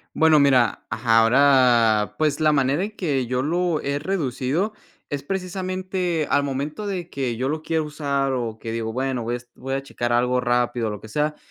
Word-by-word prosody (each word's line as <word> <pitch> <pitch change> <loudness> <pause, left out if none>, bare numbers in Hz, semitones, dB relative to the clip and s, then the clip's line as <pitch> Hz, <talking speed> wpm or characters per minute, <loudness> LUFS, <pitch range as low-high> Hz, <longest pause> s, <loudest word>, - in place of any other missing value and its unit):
Bueno, 160 -1 +5
mira, 130 -5 +3
ajá, 115 +2 +2
ahora, 115 -4 +4
pues, 150 -1 +1
la 155 -1 +4
manera 140 +2 +2
en 205 - -2
que 140 -8 -1
yo 125 +1 -1
lo 170 +2 0
he 140 +1 -2
reducido, 155 - -1 0.4
es 145 -1 -4
precisamente 185 -2 -2
al 145 - +3
momento 145 +8 -3
de 180 -4 -4
que 130 -7 -3
yo 130 +3 -1
lo 155 +2 -2
quiera 160 0 0
usar, 140 -3 -1
o, 115 -4 -3
que 115 - -5
digo: 115 -1 -3
"Bueno, 130 0 -2
voy 120 +1 -2
a - - 0
es 120 0 -13
voy 135 +1 -5
a 135 - -2
checar 120 -3 -3
algo 125 +1 +2
rápido, 120 -2 0
o - - -3
lo 105 -1 -6
que 110 - -11
sea", 150 +5 -1
140 Hz, 205 wpm, -23 LUFS, 120-155 Hz, 0.4 s, Bueno